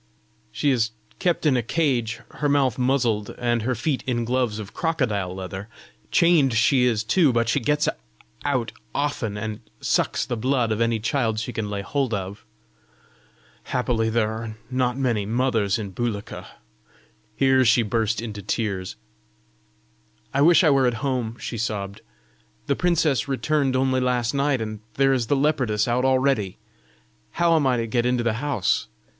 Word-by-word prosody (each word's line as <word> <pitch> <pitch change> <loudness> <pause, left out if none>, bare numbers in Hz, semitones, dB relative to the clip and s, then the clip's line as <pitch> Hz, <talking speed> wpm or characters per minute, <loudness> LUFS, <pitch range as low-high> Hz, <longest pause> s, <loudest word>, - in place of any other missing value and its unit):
"She 145 - +1
is 115 -4 +1 0.3
kept 175 -2 0
in 145 -4 +4
a 125 - +2
cage, 120 -3 0
her 145 - -1
mouth 135 -4 +2
muzzled, 125 -5 0
and 120 -1 0
her 125 +3 -1
feet 130 +3 -1
in 120 -2 0
gloves 125 -3 0
of 105 -2 -8
crocodile 110 - -1
leather. 95 +2 -6 0.4
Chained 160 -8 +4
she 125 +3 +4
is 115 -3 +1
too; 145 +6 +3
but 115 -1 +1
she 115 +5 +2
gets 150 +5 +1 0.6
out 130 -5 0 0.2
often, 130 -8 -1
and 110 0 -4 0.2
sucks - - 0
the 120 - -3
blood 125 0 0
of 110 +1 -1
any 115 -1 +1
child 115 -1 0
she 115 +2 -4
can 110 -2 -3
lay 100 -1 -3
hold 135 -2 -1
of. 100 +1 -6 1.2
Happily 120 -3 0
there 110 -1 +1
are 110 -1 -6
not 125 -1 0
many 115 -7 0
mothers 115 -4 +1
in 105 -3 -5
Bulika!" 105 +1 -4 0.9
Here 130 0 +4
she 120 0 +4
burst 110 +1 0
into 105 -3 -6
tears. 100 -2 -3 1.4
"I 140 - +2
wish 170 +4 +6
I 155 - +5
were 135 -2 +4
at 120 - 0
home!" 125 -4 -2
she 115 - -5
sobbed. 100 -3 -3 0.6
"The 140 - +1
princess 160 -7 +1
returned 140 0 0
only 130 0 +2
last 125 -1 0
night, 140 -2 +1
and 110 -1 -4 0.2
there 135 0 +3
is 125 -4 0
the 145 - +2
leopardess 135 -7 +1
out 125 +2 +1
already! 130 -7 +1 0.8
How 170 -1 +3
am 150 -4 +2
I 125 -1 +2
to 115 - -1
get 120 +1 0
into 125 -1 +1
the 115 -2 +1
house? 140 -10 0
120 Hz, 165 wpm, -24 LUFS, 110-135 Hz, 1.4 s, wish